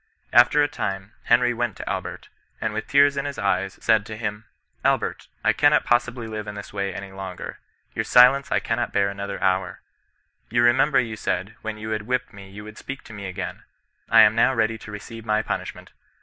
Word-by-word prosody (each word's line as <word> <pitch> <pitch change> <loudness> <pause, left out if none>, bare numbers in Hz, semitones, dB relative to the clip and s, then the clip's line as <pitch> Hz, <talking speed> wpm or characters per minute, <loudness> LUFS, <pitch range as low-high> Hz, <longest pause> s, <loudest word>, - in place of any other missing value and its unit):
After 120 +5 +6
a - - +2
ti^ne, 95 -5 -4
Henry 120 +1 +4
went 120 -3 -2
to - - -8
Albert, - - -5 0.3
and 110 - -2
with 110 0 -4
tears 140 0 +4
in 140 - -1
his 140 -1 -4
eyes, 100 -2 -1
said 110 -2 +4
to 110 -1 -7
him, 105 -1 -4
^ - - -45
Albert, - - 0 0.2
I - - +4
cannot - - +4
possibly 120 0 +1
live 110 -1 -6
in 105 - -6
this 100 - -9
way 100 0 -2
any 100 +1 -7
longer. 95 -2 -7 0.3
Your - - -1
silence 130 +3 +5
I - - +3
cannot 115 +1 -2
bear 100 0 +1
anoiiier 100 0 -5
hour. 95 0 0 0.7
You 120 +1 +2
remember 130 +5 +4
you 115 -2 -2
said, 95 +2 -2
when 110 -1 -5
you 110 +1 -6
had 105 -1 -3
whipped 125 0 -1
me 100 -1 -12
you 100 +2 -10
would 110 0 -11
speak 135 0 -7
to 110 - -12
me 100 -2 -6
again; 95 +1 -6 0.5
I 115 - +8
am 105 -1 +6
now 125 +4 +3
ready 115 0 0
to 105 - -10
receive 115 +2 -9
your 110 0 +2
punishment. - - -5
110 Hz, 210 wpm, -24 LUFS, 100-120 Hz, 0.7 s, I